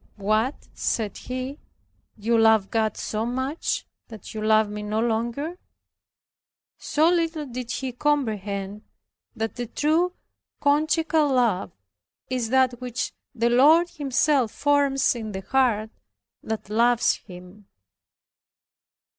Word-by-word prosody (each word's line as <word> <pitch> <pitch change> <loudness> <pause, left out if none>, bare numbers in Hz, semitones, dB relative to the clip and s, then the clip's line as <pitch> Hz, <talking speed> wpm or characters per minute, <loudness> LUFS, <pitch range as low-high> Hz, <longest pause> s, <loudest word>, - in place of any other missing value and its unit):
"What," 215 +6 0
said 215 -4 -2
he, 255 +3 -5 0.6
"you 225 +3 +1
love 220 -3 +4
God 220 -2 0
so 215 0 -2
much, 260 +6 -2 0.2
that 220 -4 -10
you 215 - -5
love 215 0 +4
me 210 0 -6
no 210 +1 -2
longer." 240 +9 -2 1.2
So 310 +2 +2
little 330 -3 +1
did 250 -2 -6
he 260 +1 -3
comprehend 210 -8 -1 0.5
that 225 -1 -3
the 240 -1 -3
true 325 +8 +1 0.5
conjugal 310 +1 +2
love 230 -7 +1 0.6
is 245 -3 -1
that 255 -1 +2
which 250 +1 -3 0.2
the 235 0 +1
Lord 310 +8 +6
Himself 275 -4 +1
forms 285 -2 +2
in 220 -3 -6
the 190 - -4
heart 220 -2 +1 0.5
that 220 -2 -5
loves 235 +2 +3
Him. 180 +2 -14
240 Hz, 115 wpm, -24 LUFS, 215-285 Hz, 1.2 s, Lord